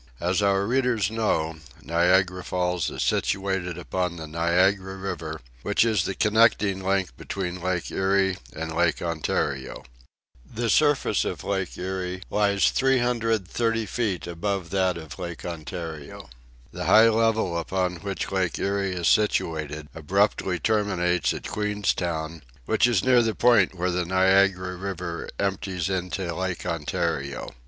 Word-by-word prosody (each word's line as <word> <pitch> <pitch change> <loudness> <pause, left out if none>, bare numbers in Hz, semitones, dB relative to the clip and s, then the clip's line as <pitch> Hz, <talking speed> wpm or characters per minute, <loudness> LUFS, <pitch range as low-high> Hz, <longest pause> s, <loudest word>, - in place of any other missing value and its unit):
As 90 +4 +1
our 100 -1 +2
readers 120 -4 +1
know, 80 -8 0 0.3
Niagara 90 +2 +2
Falls 90 -1 -1
is - - -3
situated 95 -3 -1
upon 90 0 -2
the 80 -2 -7
Niagara 90 +4 +1
River, 85 -5 -5 0.2
which - - +2
is 110 -7 +1
the 95 - -3
connecting 105 -3 +3
link 95 -7 0
between 90 -2 -4
Lake 90 -1 -2
Erie 95 0 +1 0.2
and 80 +1 -4
Lake 85 +1 +1
Ontario. 75 -5 -2 0.6
The 115 - -2
surface 145 -2 +3
of - - -4
Lake 95 -2 -2
Erie 90 0 -4
lies 100 -1 +3
330 115 -3 +1
feet 105 -4 -2
above 85 +1 -3
that 95 -2 +1
of 80 0 -9
Lake 85 -2 -6
Ontario. 80 -4 -7 0.4
The - - -5
high 110 +1 +7
level 110 -5 +1
upon 90 +1 -1
which 100 +2 -4
Lake 95 -3 0
Erie 100 -1 -1
is 85 -2 -1
situated 75 -8 +1
abruptly 95 +2 +1
terminates 95 -4 +1
at - - -5
Queenstown, 85 -6 -2 0.2
which 120 - +3
is 115 -6 +2
near 125 -2 +5
the 115 -2 0
point 115 -6 +4
where 90 +1 -1
the 90 0 -1
Niagara 95 0 +3
River 90 -3 -5
empties 95 -3 -2
into 90 -1 -2
Lake 95 +1 -3
Ontario. 75 -4 -2
95 Hz, 135 wpm, -25 LUFS, 85-100 Hz, 0.6 s, high